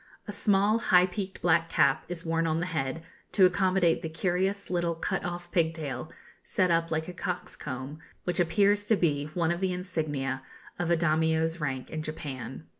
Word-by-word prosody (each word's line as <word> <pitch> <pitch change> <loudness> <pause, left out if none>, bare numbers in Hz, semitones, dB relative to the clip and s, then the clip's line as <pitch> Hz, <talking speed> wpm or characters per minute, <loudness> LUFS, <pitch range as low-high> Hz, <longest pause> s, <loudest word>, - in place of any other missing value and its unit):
A - - -3
small 205 +1 +3
high 180 -5 +5
peaked 190 +1 -5
black 165 -1 +3
cap 155 -4 +3
is 175 -1 -5
worn 165 0 +1
on 160 0 +1
the 175 - -1
head, 160 -2 -2 0.3
to 190 - +6
accommodate 185 -2 +3
the 160 - -4
curious 185 +4 -1
little 175 -2 0
cut 165 - -2
off 175 0 -5
pigtail, 160 -6 -1 0.3
set 185 -2 +1
up 165 0 +2
like 160 0 -1
a 180 - -6
cock's 180 0 -4
comb, 130 +4 -6 0.2
which 180 +1 -1
appears 200 +5 +3
to 220 - +5
be 145 -6 +1
one 170 -2 +2
of 170 - -1
the 190 -1 +1
insignia 150 -7 -2 0.4
of 175 -1 -1
a 170 - +4
Daimio's 160 0 +1
rank 130 -3 -3
in 155 - -3
Japan. 135 - -6
170 Hz, 185 wpm, -28 LUFS, 160-180 Hz, 0.4 s, to